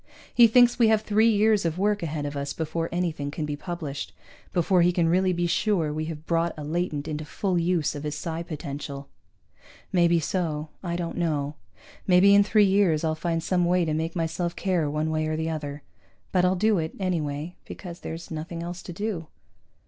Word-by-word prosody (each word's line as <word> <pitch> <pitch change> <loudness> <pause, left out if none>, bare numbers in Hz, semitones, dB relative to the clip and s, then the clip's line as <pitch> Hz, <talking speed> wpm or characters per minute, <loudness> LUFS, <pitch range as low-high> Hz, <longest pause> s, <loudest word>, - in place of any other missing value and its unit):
He 240 -1 +8
thinks 245 +1 +5
we 230 - +6
have 220 -1 +4
three 220 +2 +4
years 215 -1 +3
of 165 0 -1
work 205 +2 +1
ahead 155 -3 -3
of 145 0 -4
us 140 0 -3
before 165 +1 -3
anything 165 -5 -2
can 150 +1 -3
be 150 -1 -3
published, 150 -3 -5 0.4
before 180 +1 +3
he 175 +1 +4
can 170 -2 +1
really 185 +2 +3
be 175 0 0
sure 170 -3 +1
we 155 +1 -2
have 155 -1 -7
brought 165 0 0
a 150 - -6
latent 155 -1 -2
into 155 0 -3
full 180 +4 -1
use 170 -2 +1
of 145 - -6
his 150 0 -3
psi 165 +1 -4
potential. 145 -4 -6 0.8
Maybe 170 -2 +4
so, 155 -2 -2
I 170 -2 -3
don't 170 -1 -4
know. 150 -4 -1 0.5
Maybe 190 +2 +6
in 200 0 +7
three 210 0 +4
years 190 -5 +3
I'll 160 -1 +1
find 165 0 -2
some 180 0 +1
way 180 0 +2
to 155 - -1
make 160 +2 -2
myself 170 +1 -2
care 175 -6 0
one 155 +2 -1
way 155 0 0
or 155 0 -1
the 160 0 -1
other. 145 -2 -5 0.5
But 180 -1 +3
I'll 185 +1 +3
do 210 +1 +2
it, 160 0 -4
anyway, 160 -3 -2
because 175 -2 -8
there's 165 +1 -7
nothing 165 +2 -5
else 175 +1 -6
to 175 - -8
do. 190 -4 -3
170 Hz, 200 wpm, -26 LUFS, 155-185 Hz, 0.8 s, He